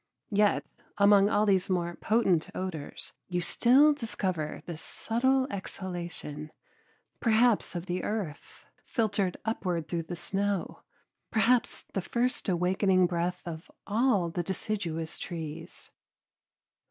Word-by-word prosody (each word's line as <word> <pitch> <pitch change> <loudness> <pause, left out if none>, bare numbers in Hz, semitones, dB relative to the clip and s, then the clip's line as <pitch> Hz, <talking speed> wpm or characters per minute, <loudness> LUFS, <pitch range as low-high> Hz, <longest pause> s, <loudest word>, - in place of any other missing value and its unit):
Yet 205 0 +3 0.3
among 200 0 +6
all 210 0 +3
these 195 -2 +2
more 175 -2 0
potent 195 -7 +2
odors 175 -6 -5
you 180 -1 -1
still 260 - +5
discover 190 - -3
this 165 -2 -6
subtle 260 +3 +1
exhalation, 175 -6 -5 0.7
perhaps 230 -3 +3
of 175 0 -3
the 180 0 -2
earth 200 -9 -5 0.2
filtered 205 -6 0
upward 180 -7 -1
through 170 -1 -1
the 175 - -3
snow, 200 +1 -2 0.5
perhaps 235 +2 +2
the 195 - 0
first 240 +3 -1
awakening 185 +1 +3
breath 175 +1 -1
of 165 -1 -7 0.2
all 215 -5 +2
the 175 - -1
deciduous 170 -3 -3
trees. 160 -4 -7
190 Hz, 115 wpm, -29 LUFS, 175-220 Hz, 0.7 s, among